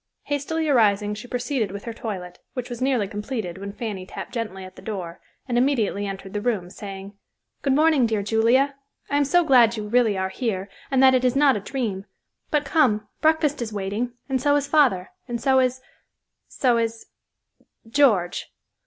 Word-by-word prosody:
Hastily 310 Hz, +3 st, -2 dB
arising 210 Hz, -6 st, +3 dB
she 215 Hz, +3 st, -8 dB
proceeded 245 Hz, -3 st, -1 dB
with 200 Hz, +1 st, -7 dB
her 230 Hz, -, -5 dB
toilet, 185 Hz, -6 st, -6 dB, 0.2 s
which 250 Hz, -1 st, -5 dB
was 240 Hz, 0 st, -6 dB
nearly 255 Hz, -6 st, +1 dB
completed 205 Hz, -3 st, -5 dB
when 200 Hz, 0 st, -6 dB
Fanny 205 Hz, -3 st, -5 dB
tapped 185 Hz, -, -8 dB
gently 215 Hz, -6 st, -4 dB
at 185 Hz, -, -12 dB
the -, -, -12 dB
door, 180 Hz, -6 st, -6 dB, 0.3 s
and 240 Hz, -2 st, +1 dB
immediately 225 Hz, -6 st, +1 dB
entered 195 Hz, 0 st, -7 dB
the 210 Hz, -, -2 dB
room, 205 Hz, -7 st, -1 dB
saying, 195 Hz, 0 st, -8 dB, 0.5 s
"Good 275 Hz, -, +1 dB
morning, 300 Hz, -4 st, +4 dB
dear 215 Hz, -2 st, -1 dB
Julia. 230 Hz, +6 st, +3 dB, 0.4 s
I 285 Hz, -, +2 dB
am 290 Hz, -, +3 dB
so 350 Hz, +5 st, +4 dB
glad 240 Hz, -6 st, +5 dB
you 210 Hz, -1 st, -4 dB
really 225 Hz, -3 st, +3 dB
are 190 Hz, 0 st, -1 dB
here 195 Hz, -3 st, -3 dB, 0.2 s
and 265 Hz, -1 st, +3 dB
that 260 Hz, 0 st, +7 dB
it 255 Hz, -1 st, +2 dB
is 250 Hz, 0 st, +2 dB
not 280 Hz, -2 st, +5 dB
a -, -, -1 dB
dream. 205 Hz, -4 st, -3 dB, 0.4 s
But 295 Hz, -1 st, +1 dB
come, 235 Hz, -8 st, +2 dB
breakfast 310 Hz, -3 st, +2 dB
is 225 Hz, -2 st, -3 dB
waiting 210 Hz, +4 st, -3 dB
and 265 Hz, -2 st, -1 dB
so 285 Hz, +1 st, +3 dB
is 285 Hz, -1 st, +1 dB
father, 265 Hz, -12 st, +3 dB, 0.2 s
and 240 Hz, -1 st, -3 dB
so 265 Hz, +2 st, +3 dB
is—so 255 Hz, -1 st, -2 dB
is—George." 225 Hz, -2 st, -2 dB
230 Hz, 180 wpm, -24 LUFS, 200-265 Hz, 0.5 s, that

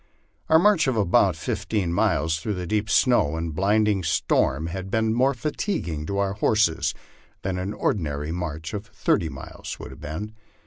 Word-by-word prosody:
Our 160 Hz, -, +7 dB
march 175 Hz, -4 st, +4 dB
of 110 Hz, -9 st, +3 dB
fifteen 95 Hz, -6 st, -2 dB
miles 80 Hz, -5 st, +1 dB
through 105 Hz, +5 st, -3 dB
the 90 Hz, -1 st, -4 dB
deep 105 Hz, +4 st, -1 dB
snow 90 Hz, -, +3 dB
and 80 Hz, -1 st, -3 dB
blinding 105 Hz, +3 st, +2 dB
storm 80 Hz, -3 st, +1 dB
had 95 Hz, +3 st, -5 dB
been 110 Hz, +1 st, +1 dB
more 130 Hz, +3 st, +2 dB
fatiguing 115 Hz, -, -3 dB
to 100 Hz, -, -2 dB
our 100 Hz, -1 st, +1 dB
horses 105 Hz, -5 st, +1 dB, 0.5 s
than 95 Hz, -1 st, -2 dB
an 95 Hz, +2 st, -3 dB
ordinary 75 Hz, -8 st, -1 dB
march 80 Hz, -1 st, -4 dB
of 105 Hz, +1 st, -5 dB
thirty 90 Hz, -4 st, 0 dB
miles -, -, -8 dB
would -, -, -8 dB
have -, -, -12 dB
been. 90 Hz, +9 st, -5 dB
95 Hz, 165 wpm, -24 LUFS, 80-110 Hz, 0.5 s, Our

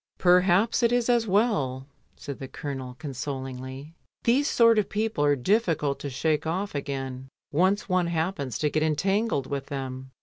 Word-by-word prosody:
"Perhaps 180 Hz, +6 st, +4 dB
it 235 Hz, 0 st, +3 dB
is 245 Hz, 0 st, +1 dB
as 235 Hz, -2 st, +3 dB
well," 155 Hz, -, +1 dB, 0.3 s
said 140 Hz, -2 st, -7 dB
the 135 Hz, -, -6 dB
Colonel 130 Hz, -2 st, -6 dB
con 145 Hz, 0 st, -6 dB
solingly. 130 Hz, +2 st, -6 dB, 0.3 s
"These 265 Hz, +5 st, +3 dB
sort 230 Hz, -2 st, +5 dB
of 210 Hz, -, -1 dB
people 215 Hz, -7 st, -1 dB
are 145 Hz, 0 st, +4 dB
difficult 155 Hz, -, +1 dB
to 140 Hz, -, -5 dB
shake 155 Hz, +3 st, 0 dB
off 190 Hz, +5 st, -2 dB
again 135 Hz, -2 st, -4 dB, 0.2 s
once 185 Hz, +7 st, +2 dB
one 185 Hz, -2 st, +1 dB
happens 160 Hz, -, -2 dB
to 150 Hz, -1 st, 0 dB
get 155 Hz, -, +1 dB
entangled 170 Hz, -, +1 dB
with 140 Hz, 0 st, -4 dB
them." 130 Hz, -2 st, -5 dB
155 Hz, 165 wpm, -26 LUFS, 135-200 Hz, 0.3 s, sort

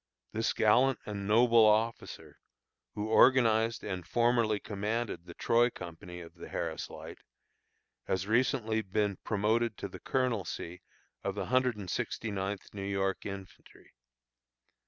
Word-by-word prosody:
This 110 Hz, +1 st, 0 dB
gallant 125 Hz, +5 st, +4 dB
and 100 Hz, -2 st, -5 dB
noble 115 Hz, +1 st, +5 dB
officer, 110 Hz, +2 st, 0 dB, 0.6 s
who 105 Hz, +1 st, -3 dB
organized 115 Hz, -3 st, +4 dB
and 95 Hz, -3 st, -4 dB
formerly 115 Hz, 0 st, +2 dB
commanded 105 Hz, -2 st, -3 dB
the 85 Hz, -, -10 dB
Troy 120 Hz, +1 st, +3 dB
company 90 Hz, -3 st, -9 dB
of 85 Hz, -, -12 dB
the -, -, -11 dB
Harris -, -, -3 dB
Light, -, -, -10 dB, 0.9 s
has 95 Hz, 0 st, 0 dB
recently 115 Hz, -1 st, +1 dB
been 100 Hz, -1 st, -1 dB
promoted 110 Hz, +1 st, 0 dB
to -, -, -4 dB
the -, -, -10 dB
colonelcy 115 Hz, -8 st, -2 dB, 0.4 s
of 100 Hz, -, -2 dB
the 100 Hz, -2 st, -3 dB
Hundred 130 Hz, -3 st, +3 dB
and 100 Hz, -3 st, -7 dB
Sixty 110 Hz, +4 st, -3 dB
ninth 100 Hz, 0 st, -4 dB
New 100 Hz, -, -6 dB
York 95 Hz, 0 st, -1 dB
Infantry. 95 Hz, -1 st, -11 dB
105 Hz, 135 wpm, -31 LUFS, 100-115 Hz, 0.9 s, noble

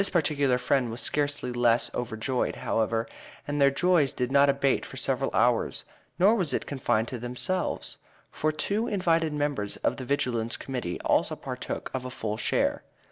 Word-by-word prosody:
This 195 Hz, -, +2 dB
particular 145 Hz, -6 st, +2 dB
friend 125 Hz, -1 st, +1 dB
was 115 Hz, +2 st, -5 dB
scarcely 145 Hz, -3 st, -1 dB
less 120 Hz, -1 st, +2 dB
overjoyed, 120 Hz, +1 st, -2 dB
however, 115 Hz, +1 st, 0 dB, 0.4 s
and 145 Hz, 0 st, -1 dB
their 140 Hz, -, +7 dB
joy 170 Hz, +1 st, +3 dB
did 125 Hz, -1 st, -2 dB
not 140 Hz, 0 st, +5 dB
abate 140 Hz, -1 st, +2 dB
for -, -, -9 dB
several -, -, +1 dB
hours; -, -, +1 dB, 0.3 s
nor 195 Hz, +5 st, +5 dB
was 185 Hz, -9 st, +1 dB
it -, -, -2 dB
confined 120 Hz, -5 st, 0 dB
to 125 Hz, -, -5 dB
themselves, 125 Hz, +10 st, -1 dB, 0.3 s
for 155 Hz, -, 0 dB
two 205 Hz, +9 st, -1 dB
invited 165 Hz, -6 st, +1 dB
members 145 Hz, -8 st, -1 dB
of -, -, +1 dB
the 130 Hz, -, -5 dB
Vigilance 120 Hz, -4 st, -1 dB
Committee 125 Hz, -10 st, -4 dB
also -, -, +1 dB
partook -, -, -5 dB
of 130 Hz, -1 st, -3 dB
a 130 Hz, -, -5 dB
full 110 Hz, -4 st, -3 dB
share. -, -, +1 dB
135 Hz, 170 wpm, -27 LUFS, 120-150 Hz, 0.4 s, their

